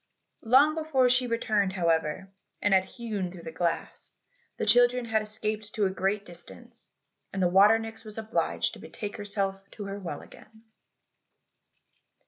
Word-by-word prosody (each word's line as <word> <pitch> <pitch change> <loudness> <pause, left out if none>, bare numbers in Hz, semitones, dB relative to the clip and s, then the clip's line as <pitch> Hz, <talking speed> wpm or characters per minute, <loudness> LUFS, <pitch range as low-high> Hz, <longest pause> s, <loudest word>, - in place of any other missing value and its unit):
Long 270 +7 +5
before 310 -5 +2
she 255 0 +2
returned, 215 -4 0
however, 170 +1 0 0.3
and 205 - +2
had 190 0 +4
hewn 210 -7 -4
through 175 -2 -11
the 160 - -6
glass, 165 +1 -3 0.5
the - - -1
children 245 +3 +5
had 220 -1 +1
escaped 215 0 -3
to 210 - +2
a 190 - +1
great 195 +2 -1
distance, 230 +7 -8 0.4
and 195 - -4
the 180 - +3
water 200 +5 +6
nix 225 0 -7
was 215 -1 -10
obliged 220 0 0
to - - -10
betake 205 -1 -7
herself 195 -1 -3
to 205 - -8
her 200 +1 -5
well 170 -7 -6
again. 220 +1 -17
210 Hz, 155 wpm, -28 LUFS, 190-225 Hz, 0.5 s, water